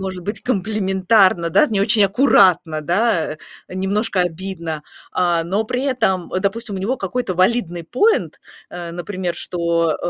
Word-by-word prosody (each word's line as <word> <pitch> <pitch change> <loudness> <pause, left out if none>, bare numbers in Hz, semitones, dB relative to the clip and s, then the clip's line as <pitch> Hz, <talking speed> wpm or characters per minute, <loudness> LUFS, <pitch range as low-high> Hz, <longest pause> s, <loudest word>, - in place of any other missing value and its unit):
может 190 -1 -5
быть, 205 +4 -5
комплиментарно, 190 -4 +2
да. 300 - +4
Не 210 -6 -1
очень 210 +1 +4
аккуратно, 190 - +3
да. 175 -1 +1 0.4
Э, - - -9
немножко 195 +1 0
обидно. 170 -3 -5 0.3
А, 175 -2 +1
но 195 +6 -1
при 250 +3 -2
этом, 190 -10 0
допустим, 210 +2 -2
у - - -3
него 215 +8 -1
какой-то 200 -1 -3
валидный 185 -2 0
поинт, 425 - +1 0.3
а, 175 -1 -7
например, 175 0 -4
что, 170 -2 -1
190 Hz, 145 wpm, -19 LUFS, 175-215 Hz, 0.4 s, да